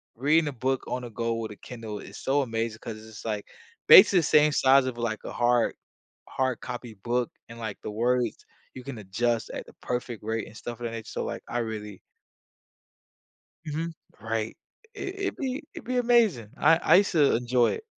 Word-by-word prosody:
reading 150 +6 +3
a - - -1
book 130 +1 -1
on 125 - -2
the 120 - -7
go 115 +1 -2
with 115 -1 -4
a - - -8
Kindle 110 -2 -8
is 100 - -10
so 140 +2 +1
amazing 115 -2 -2
'cause 110 -1 -7
it's, 110 -1 -11
like, 105 -2 -3 0.4
basically 185 - +10
the - - 0
same 150 0 +5
size 135 -1 +5
of, 130 -2 -3
like, 115 -2 -2
a - - -6
hard 120 -1 +2 0.6
hard 130 -2 -1
copy 125 -2 -6
book 120 +4 -1 0.2
and, 115 - -10
like, 110 -3 -5
the - - -5
words 120 +1 0 0.3
you 130 - -8
can 135 -4 -7
adjust 115 +4 -1
at - - -6
the - - -15
perfect 120 -2 -3
rate 110 0 -2
and - - -14
stuff 120 +1 -7
of - - -8
that 115 - -3
nature, 115 -1 -6
so, - - -4
like, - - -4
I 120 - -1
really 105 -4 -5 1.7
Mhm, 160 +2 -3 0.3
right, 110 0 -3 0.4
it 375 - -5
it'd 395 - -2
be 265 +1 -3
it'd - - -9
be 255 +1 -1
amazing, 230 - +3
I 165 +3 +5
I - - +4
used 200 +2 +3
to 150 -5 +4
enjoy 120 0 +2
it. 445 - -6
120 Hz, 200 wpm, -27 LUFS, 110-140 Hz, 1.7 s, basically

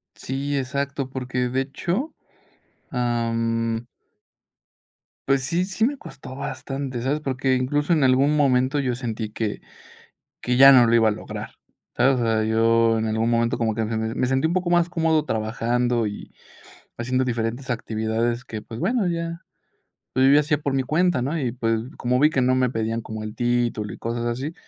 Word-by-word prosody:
Sí, 140 +2 -3
exacto, 140 0 -2
porque, 125 -1 -2
de 130 +2 0
hecho, 175 - -3 0.8
am 115 -1 -1 1.4
pues, 135 0 +3
sí 170 +7 0
sí 200 +4 0
me 280 +2 -1
costó 130 - -10
bastante, 135 -2 -5
¿sabes? 135 +5 0
Porque, 135 -2 0
incluso 145 +5 0
en 155 -4 +2
algún 135 +3 +4
momento 135 0 +2
yo 130 -3 0
sentí 115 -3 -4
que 105 -1 -3 0.8
que 125 0 0
ya 135 +1 +10
no 125 -2 +7
lo 115 - +2
iba 115 -1 +5
a 110 - +3
lograr, - - -7 0.4
¿sabes? 130 +1 +3
O 120 - 0
sea, 110 -1 +1
yo 115 +1 +3
en 110 - -1
algún 110 +1 0
momento 115 0 +1
como 110 -2 0
que 110 0 -1
me 110 0 -2
me 125 - 0
sentí 135 +3 +1
un - - -2
poco 185 -1 0
más 175 0 +3
cómodo 160 -3 +1
trabajando 120 0 0
y 105 -1 -7 0.7
haciendo 130 +2 0
diferentes 120 +1 -3
actividades 115 +1 -1
que, 110 -5 -7
pues, 115 +1 -9
bueno, 235 -4 +1
ya 170 -1 -3 0.7
pues, 130 +1 +4
yo 140 - +6
ya 150 - +6
hacía 150 -1 0
por 140 -2 -1
mi 135 -1 +1
cuenta, 155 -1 +1
¿no? 155 +5 -1
Y, 125 -5 -2
pues, 115 -2 0 0.2
como 125 +1 0
vi 150 +2 +5
que 135 - 0
no 130 +1 +3
me 130 -1 +2
pedían 115 -1 -2
como 110 -1 -7
el 110 0 -6
título 120 -3 0
y - - -9
cosas 115 +1 -3
así, 130 +7 -3
125 Hz, 180 wpm, -23 LUFS, 115-140 Hz, 1.4 s, ya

